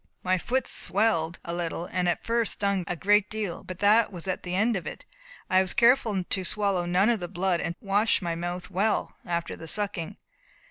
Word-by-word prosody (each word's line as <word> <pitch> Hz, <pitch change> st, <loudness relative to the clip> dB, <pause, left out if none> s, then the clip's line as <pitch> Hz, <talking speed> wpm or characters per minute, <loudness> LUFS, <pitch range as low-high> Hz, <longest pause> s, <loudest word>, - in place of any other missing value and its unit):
My 185 Hz, 0 st, +1 dB
foot 260 Hz, +8 st, 0 dB
swelled 180 Hz, -6 st, 0 dB
a 170 Hz, -, -3 dB
little, 170 Hz, 0 st, -3 dB
and 180 Hz, 0 st, -1 dB
at -, -, -1 dB
first 230 Hz, -1 st, +1 dB
stung 200 Hz, -3 st, -1 dB
a 175 Hz, -, -2 dB
great 205 Hz, +3 st, +3 dB
deal. 215 Hz, -5 st, -4 dB
But 185 Hz, -, -7 dB
that 215 Hz, +2 st, +5 dB
was 175 Hz, -4 st, -7 dB
the 180 Hz, -1 st, -3 dB
end 220 Hz, +4 st, +2 dB
of 180 Hz, -, -4 dB
it. -, -, -8 dB, 0.4 s
I 185 Hz, 0 st, +4 dB
was 190 Hz, -1 st, -1 dB
careful 235 Hz, -5 st, +4 dB
to 190 Hz, +1 st, -1 dB
swallow 195 Hz, -2 st, +1 dB
none 185 Hz, +5 st, +3 dB
of 235 Hz, -3 st, +2 dB
the 175 Hz, -, -4 dB
blood, 180 Hz, -1 st, 0 dB
and 170 Hz, -, -3 dB
to -, -, -20 dB
wash 205 Hz, +3 st, +3 dB
my 170 Hz, -3 st, -2 dB
mouth 175 Hz, +3 st, -5 dB
well 200 Hz, +4 st, 0 dB
after 170 Hz, -1 st, -2 dB
the 165 Hz, -, -10 dB
sucking." 200 Hz, -4 st, -2 dB
190 Hz, 205 wpm, -27 LUFS, 175-210 Hz, 0.4 s, that